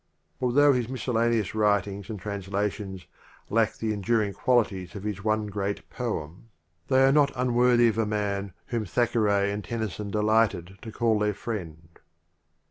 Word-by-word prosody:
Although 140 Hz, +3 st, +4 dB
his 125 Hz, -2 st, -1 dB
miscellaneous 115 Hz, -4 st, 0 dB
writings 100 Hz, -2 st, 0 dB
and 105 Hz, -3 st, -5 dB
translations 100 Hz, -1 st, -4 dB, 0.5 s
lack 110 Hz, 0 st, +2 dB
the 110 Hz, -1 st, -2 dB
enduring 105 Hz, 0 st, 0 dB
qualities 105 Hz, -8 st, 0 dB
of 100 Hz, -, -6 dB
his 105 Hz, -2 st, -4 dB
one 110 Hz, 0 st, +1 dB
great 100 Hz, -1 st, -3 dB
poem, 105 Hz, -4 st, -5 dB, 0.4 s
they 130 Hz, 0 st, +4 dB
are 135 Hz, -, +5 dB
not 145 Hz, -1 st, +4 dB
unworthy 125 Hz, -1 st, +4 dB
of 110 Hz, 0 st, -2 dB
a 110 Hz, -, +2 dB
man 100 Hz, -2 st, -2 dB
whom 115 Hz, -2 st, -2 dB
Thackeray 105 Hz, -2 st, +1 dB
and 105 Hz, 0 st, -4 dB
Tennyson 110 Hz, -3 st, -4 dB
delighted 105 Hz, -3 st, +1 dB
to 115 Hz, -, -8 dB
call 115 Hz, -1 st, +1 dB
their 105 Hz, -1 st, 0 dB
friend. 85 Hz, -8 st, -7 dB
105 Hz, 145 wpm, -26 LUFS, 100-115 Hz, 0.5 s, are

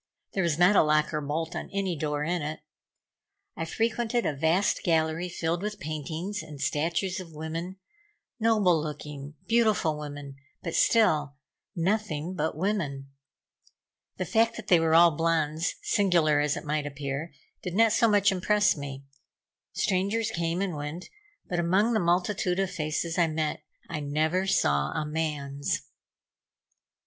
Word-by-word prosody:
There 195 Hz, -, 0 dB
was 170 Hz, -4 st, +1 dB
not 180 Hz, +4 st, +5 dB
a -, -, +7 dB
lock 155 Hz, 0 st, +2 dB
or 150 Hz, -, -1 dB
bolt 160 Hz, +3 st, -3 dB
on -, -, -5 dB
any 195 Hz, -3 st, -1 dB
door 150 Hz, -1 st, -2 dB
in 175 Hz, +2 st, -1 dB
it. 155 Hz, +1 st, -4 dB, 0.9 s
I 165 Hz, -, -3 dB
frequented 230 Hz, +5 st, 0 dB
a 150 Hz, -, 0 dB
vast 160 Hz, +7 st, +2 dB
gallery 165 Hz, +1 st, +1 dB
filled 170 Hz, 0 st, -2 dB
with 210 Hz, +1 st, -4 dB
paintings 155 Hz, +7 st, -4 dB
and 150 Hz, -2 st, -10 dB
statues 165 Hz, +7 st, -1 dB
of 170 Hz, -3 st, -9 dB
women, 165 Hz, +4 st, -5 dB, 0.6 s
noble 210 Hz, -7 st, +3 dB
looking, 150 Hz, -1 st, -7 dB
beautiful 215 Hz, -10 st, +2 dB
women, 145 Hz, -2 st, -8 dB, 0.3 s
but 170 Hz, -, -4 dB
still 155 Hz, -11 st, +3 dB, 0.4 s
nothing 180 Hz, -3 st, -1 dB
but 160 Hz, -4 st, -2 dB
women. 155 Hz, -8 st, -2 dB, 1.1 s
The -, -, -2 dB
fact 230 Hz, +1 st, +2 dB
that 220 Hz, -3 st, -8 dB
they 175 Hz, -, +6 dB
were 165 Hz, 0 st, +3 dB
all 170 Hz, 0 st, +8 dB
blondes, 160 Hz, 0 st, 0 dB
singular 170 Hz, -7 st, +3 dB
as 150 Hz, 0 st, +1 dB
it -, -, -7 dB
might 150 Hz, 0 st, -1 dB
appear, 145 Hz, +2 st, -4 dB, 0.3 s
did 180 Hz, -1 st, -5 dB
not 225 Hz, +1 st, +5 dB
so 230 Hz, -, +4 dB
much 205 Hz, -2 st, +4 dB
impress 205 Hz, +3 st, +2 dB
me. 140 Hz, -2 st, -7 dB, 0.7 s
Strangers 200 Hz, +4 st, 0 dB
came 170 Hz, 0 st, -1 dB
and 185 Hz, -5 st, -2 dB
went, 150 Hz, +4 st, -6 dB, 0.4 s
but 175 Hz, -, -1 dB
among 190 Hz, +7 st, +2 dB
the 220 Hz, -, +3 dB
multitude 180 Hz, +1 st, +1 dB
of 195 Hz, -1 st, 0 dB
faces 165 Hz, 0 st, -2 dB
I 170 Hz, -, +4 dB
met, 155 Hz, -1 st, -2 dB, 0.3 s
I 150 Hz, -, -4 dB
never 155 Hz, +6 st, 0 dB
saw 70 Hz, -, +2 dB
a 155 Hz, -, -2 dB
man's. 150 Hz, -3 st, -2 dB
165 Hz, 150 wpm, -27 LUFS, 150-190 Hz, 1.1 s, all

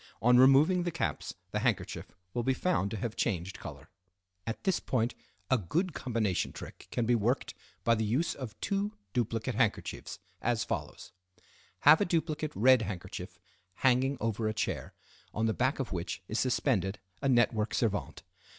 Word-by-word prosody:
On 125 Hz, +2 st, +5 dB
removing 145 Hz, +8 st, +6 dB
the 175 Hz, -, -1 dB
caps 165 Hz, -9 st, -3 dB, 0.2 s
the 105 Hz, -, 0 dB
handkerchief 115 Hz, -3 st, -1 dB, 0.2 s
will 120 Hz, -, 0 dB
be 130 Hz, +2 st, +1 dB
found 165 Hz, -, +1 dB
to 110 Hz, -, -4 dB
have 110 Hz, +2 st, -3 dB
changed 95 Hz, -3 st, -1 dB
color. -, -, -9 dB, 0.6 s
At 115 Hz, -, -4 dB
this 190 Hz, -2 st, +2 dB
point 120 Hz, -2 st, 0 dB, 0.4 s
a 130 Hz, -, +5 dB
good 165 Hz, -, -1 dB
combination 110 Hz, -9 st, -1 dB
trick -, -, -10 dB
can 120 Hz, -, -1 dB
be 120 Hz, -, +3 dB
worked 120 Hz, +3 st, +1 dB, 0.3 s
by 115 Hz, -, +4 dB
the 110 Hz, -1 st, +1 dB
use 125 Hz, +11 st, +1 dB
of 125 Hz, -6 st, -8 dB
two 200 Hz, +1 st, -1 dB, 0.2 s
duplicate 115 Hz, +1 st, -1 dB
handkerchiefs, 110 Hz, -2 st, -1 dB, 0.2 s
as 115 Hz, -1 st, +1 dB
follows: 75 Hz, -9 st, -5 dB, 0.7 s
Have 150 Hz, +4 st, +8 dB
a -, -, +4 dB
duplicate 160 Hz, -3 st, -1 dB
red 130 Hz, +3 st, +6 dB
handkerchief 90 Hz, -3 st, -6 dB, 0.5 s
hanging 130 Hz, +2 st, +4 dB
over 110 Hz, 0 st, -1 dB
a 110 Hz, -, -1 dB
chair, 110 Hz, -, -2 dB, 0.4 s
on 110 Hz, -, +1 dB
the 110 Hz, -, +2 dB
back 130 Hz, +5 st, +1 dB
of 135 Hz, -, -3 dB
which 85 Hz, -1 st, -4 dB
is 110 Hz, -, -1 dB
suspended 110 Hz, -6 st, +1 dB, 0.2 s
a 140 Hz, -, +1 dB
network 120 Hz, -3 st, +3 dB
servante. 105 Hz, -4 st, -1 dB
120 Hz, 165 wpm, -31 LUFS, 105-135 Hz, 0.7 s, Have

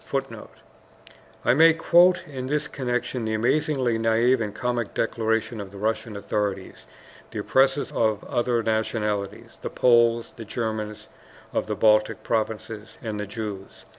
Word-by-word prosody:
[Footnote: -, -, -4 dB, 1.0 s
I -, -, +5 dB
may 160 Hz, +4 st, +6 dB
quote 175 Hz, +2 st, +4 dB
in 130 Hz, -3 st, -6 dB
this 150 Hz, +2 st, -1 dB
connection 125 Hz, -1 st, -2 dB
the 110 Hz, 0 st, -1 dB
amazingly 125 Hz, 0 st, +1 dB
naive 115 Hz, +2 st, +3 dB
and 105 Hz, -2 st, -2 dB
comic 120 Hz, -1 st, -3 dB
declaration 115 Hz, 0 st, -1 dB
of 100 Hz, -, -8 dB
the 100 Hz, -, -12 dB
Russian 110 Hz, +1 st, -2 dB
authorities, 100 Hz, -1 st, -3 dB, 0.4 s
the -, -, -8 dB
oppressors 135 Hz, +1 st, +2 dB
of 110 Hz, -2 st, 0 dB
other 120 Hz, -1 st, 0 dB
nationalities 105 Hz, -2 st, -2 dB
the -, -, -4 dB
Poles, 115 Hz, -1 st, +3 dB
the 115 Hz, -, -7 dB
Germans 110 Hz, -1 st, -4 dB, 0.5 s
of -, -, -1 dB
the -, -, -2 dB
Baltic 110 Hz, -1 st, +3 dB
provinces, 110 Hz, -1 st, -3 dB
and 110 Hz, -2 st, -4 dB
the 105 Hz, -, -4 dB
Jews. 105 Hz, -2 st, -7 dB
115 Hz, 140 wpm, -25 LUFS, 105-125 Hz, 1.0 s, may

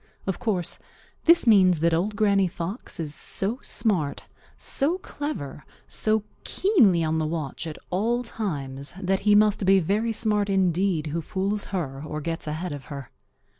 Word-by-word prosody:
Of 190 Hz, -, -2 dB
course 205 Hz, -8 st, -2 dB, 0.5 s
this 335 Hz, -3 st, +6 dB
means 185 Hz, -7 st, +5 dB
that 170 Hz, 0 st, +3 dB
Old 195 Hz, +6 st, 0 dB
Granny 200 Hz, -2 st, +3 dB
Fox 185 Hz, +3 st, -5 dB
is 155 Hz, -3 st, -3 dB
so 210 Hz, +9 st, +2 dB
smart, 175 Hz, -11 st, -1 dB, 0.3 s
so 305 Hz, +6 st, 0 dB
clever, 285 Hz, -, -6 dB, 0.2 s
so 215 Hz, -1 st, +1 dB, 0.2 s
keenly 230 Hz, -, +3 dB
on 160 Hz, 0 st, 0 dB
the 155 Hz, -, 0 dB
watch 160 Hz, 0 st, -4 dB
at 155 Hz, -, -6 dB
all 230 Hz, +7 st, 0 dB
times, 140 Hz, -, -4 dB
that 190 Hz, 0 st, 0 dB
he 205 Hz, -, +7 dB
must 210 Hz, -1 st, +4 dB
be 195 Hz, +1 st, +5 dB
very 210 Hz, +6 st, 0 dB
smart 210 Hz, -2 st, +1 dB
indeed 185 Hz, -3 st, +1 dB
who 165 Hz, -, -1 dB
fools 195 Hz, +5 st, -2 dB
her 140 Hz, -7 st, -4 dB
or 155 Hz, 0 st, -5 dB
gets 165 Hz, +1 st, -4 dB
ahead 160 Hz, +4 st, -3 dB
of 145 Hz, -3 st, -7 dB
her. 140 Hz, -3 st, -8 dB
190 Hz, 160 wpm, -25 LUFS, 160-210 Hz, 0.5 s, he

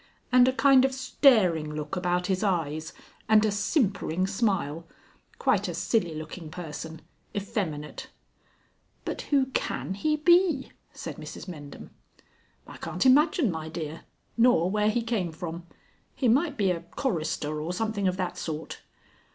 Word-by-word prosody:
"And 250 Hz, 0 st, +6 dB
a -, -, +4 dB
kind 265 Hz, 0 st, +5 dB
of 265 Hz, 0 st, +1 dB
staring 185 Hz, -, +3 dB
look 150 Hz, +3 st, -4 dB
about 180 Hz, -1 st, 0 dB
his 190 Hz, +1 st, 0 dB
eyes, 160 Hz, -5 st, -1 dB, 0.4 s
and 220 Hz, 0 st, +6 dB
a 215 Hz, -, +2 dB
simpering 200 Hz, -, 0 dB
smile. 190 Hz, -6 st, -1 dB, 0.5 s
Quite -, -, +2 dB
a -, -, -4 dB
silly 175 Hz, -9 st, 0 dB
looking 155 Hz, +1 st, -7 dB
person. 160 Hz, -1 st, -7 dB, 0.3 s
Effeminate." 185 Hz, -8 st, -4 dB, 1.0 s
"But -, -, -3 dB
who 270 Hz, -2 st, +2 dB
can -, -, -2 dB
he 305 Hz, +10 st, 0 dB
be?" 345 Hz, -2 st, +3 dB, 0.2 s
said -, -, -7 dB
Mrs -, -, -8 dB
Mendham. 145 Hz, -5 st, -9 dB, 0.7 s
"I -, -, -11 dB
can't -, -, -3 dB
imagine, 290 Hz, -, +5 dB
my 160 Hz, -1 st, -5 dB
dear. 160 Hz, 0 st, -5 dB, 0.4 s
Nor 230 Hz, -7 st, +4 dB
where 210 Hz, 0 st, +2 dB
he 235 Hz, +2 st, 0 dB
came 215 Hz, -7 st, -1 dB
from. 170 Hz, +1 st, -7 dB, 0.5 s
He 260 Hz, -, +1 dB
might 280 Hz, +5 st, +2 dB
be 195 Hz, -4 st, +2 dB
a 170 Hz, -, -1 dB
chorister 160 Hz, -, -2 dB
or 160 Hz, +3 st, -3 dB
something 205 Hz, 0 st, -1 dB
of 185 Hz, 0 st, 0 dB
that 180 Hz, -2 st, -3 dB
sort." 155 Hz, -1 st, -5 dB
190 Hz, 145 wpm, -27 LUFS, 160-245 Hz, 1.0 s, And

